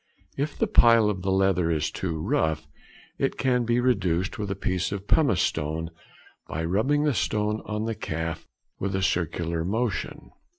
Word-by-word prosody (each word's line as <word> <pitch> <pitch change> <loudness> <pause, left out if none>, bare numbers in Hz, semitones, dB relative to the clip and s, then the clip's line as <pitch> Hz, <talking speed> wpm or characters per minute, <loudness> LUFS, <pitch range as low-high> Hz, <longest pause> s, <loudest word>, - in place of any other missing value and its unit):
If 145 +2 -3
the - - +2
pile 115 - +5
of 95 -3 -5
the 95 - -2
leather 95 -3 +2
is 80 -1 0
too 85 -4 -3
rough, 80 0 0 0.5
it - - 0
can 125 -2 +1
be 120 +1 +2
reduced 95 -8 +1
with 105 -1 -3
a 100 - -1
piece 90 -2 -1
of 100 0 -5
pumice 140 - +3
stone, 80 +2 -2 0.6
by 80 +2 -3
rubbing 130 - +2
the 150 -2 +2
stone 105 -1 0
on 105 0 -2
the 115 - -1
calf 80 -5 -4 0.3
with 95 0 -2
a 95 - 0
circular 85 -3 -1
motion. 110 +6 -2
95 Hz, 170 wpm, -26 LUFS, 85-115 Hz, 0.6 s, pile